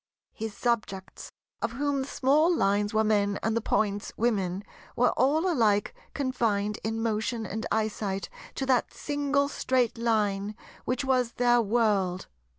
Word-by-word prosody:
His 220 -2 -6
subjects—of 230 0 -4
whom 285 +2 0
the 265 - -4
small 290 +5 +3
Lines 205 - +1
were 220 0 +2
men 205 -2 +2
and 225 0 +1
the 230 - +1
Points 205 -1 0
Women—were 205 +2 -1
all 310 +7 +2
alike 220 - +2 0.2
confined 225 -7 0
in 225 +1 -2
motion 225 +1 -1
and 220 +3 -4
eyesight 205 -3 -1 0.3
to 270 - -2
that 260 -2 +2
single 285 -1 0
Straight 255 -4 0
Line, 210 -3 0 0.3
which 255 +2 -1
was 255 -3 +1
their 240 -1 +3
World. 205 -5 +1
225 Hz, 135 wpm, -28 LUFS, 205-255 Hz, 0.3 s, small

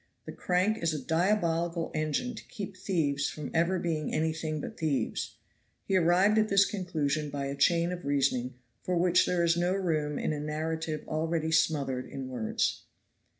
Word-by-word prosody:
The - - -6
crank 190 +5 +1
is 165 -2 +1
a - - -2
diabolical 170 -1 +1
engine 155 - -1
to 220 - -9
keep 200 -2 -7
thieves 160 -7 0
from 150 -3 -6
ever 170 +3 +2
being 160 -4 -2
anything 160 0 -1
but - - -7
thieves. 155 -4 -1 0.5
He 195 - 0
arrived 185 +5 +4
at 215 0 +2
this 195 0 +5
conclusion 155 -7 -1
by 140 -1 -3
a 140 0 -3
chain 170 +4 +3
of 180 0 -5
reasoning 135 -3 0 0.3
for 180 -1 -1
which 180 +1 +4
there 175 -1 +1
is 170 0 +3
no 175 +2 +1
room 155 -6 -1
in - - -1
a 150 - -3
narrative 155 +1 -3
already 160 0 -1
smothered 145 -5 +1
in 135 -1 -6
words. 120 -4 -1
160 Hz, 170 wpm, -29 LUFS, 150-180 Hz, 0.5 s, this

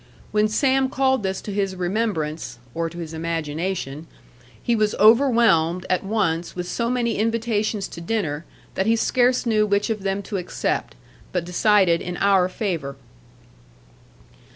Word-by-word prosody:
When 210 0 +3
Sam 265 +4 +2
called 265 -2 +1
this 190 -1 -2
to 205 - -6
his 195 -1 -1
remembrance 180 -4 -2 0.2
(or 165 0 -2
to 170 - -12
his 165 -2 -6
imagination) 160 -1 -3 0.6
he 235 - +2
was 215 -1 +1
overwhelmed, 215 - +4
at 185 - +1
once, 190 -5 -1
with 180 -1 -4
so 235 +6 -1
many 240 -3 0
invitations 220 -2 0
to 170 - -9
dinner, 170 -6 -2 0.3
that 190 - -1
he 225 - +4
scarce 250 +2 +2
knew 215 -2 +2
which 205 +2 +1
of 215 -2 -3
them 195 +1 -2
to 200 +1 -4
accept; 175 - -2 0.4
but 180 -2 -1
decided 180 -1 +3
in 175 0 -5
our 195 -2 +3
favour. 170 -9 -3
195 Hz, 150 wpm, -23 LUFS, 170-225 Hz, 0.6 s, overwhelmed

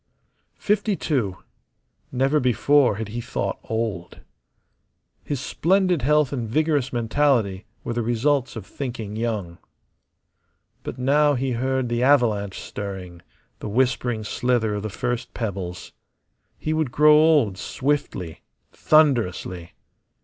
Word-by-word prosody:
Fifty 210 0 0
two. 115 - -1 0.7
Never 135 +4 +2
before 130 0 +3
had 110 0 -5
he 120 +3 -4
thought - - -3
old. 110 -6 -4 1.0
His 145 -3 -3
splendid 180 +4 +1
health 150 +1 +2
and 120 -5 -3
vigorous 150 0 +1
mentality 115 -5 +1 0.2
were 120 - -3
the 120 - -1
results 125 +4 0
of 110 -4 -7
thinking 115 -6 -6
young. 110 -7 -3 1.2
But - - -7
now 145 +3 +3
he 130 +1 -1
heard 130 +1 -1
the 120 0 -1
avalanche 115 -8 +2
stirring, 95 -4 -7 0.4
the - - -5
whispering 120 -1 0
slither 115 0 0
of 105 - -3
the 110 - -4
first 120 +4 -4
pebbles. 95 -6 -5 0.7
He 155 - -2
would 155 -5 -1
grow 150 +3 +6
old 150 -11 +4
swiftly, 130 - -2 0.3
thunderously. 110 - +1
120 Hz, 120 wpm, -23 LUFS, 105-145 Hz, 1.2 s, grow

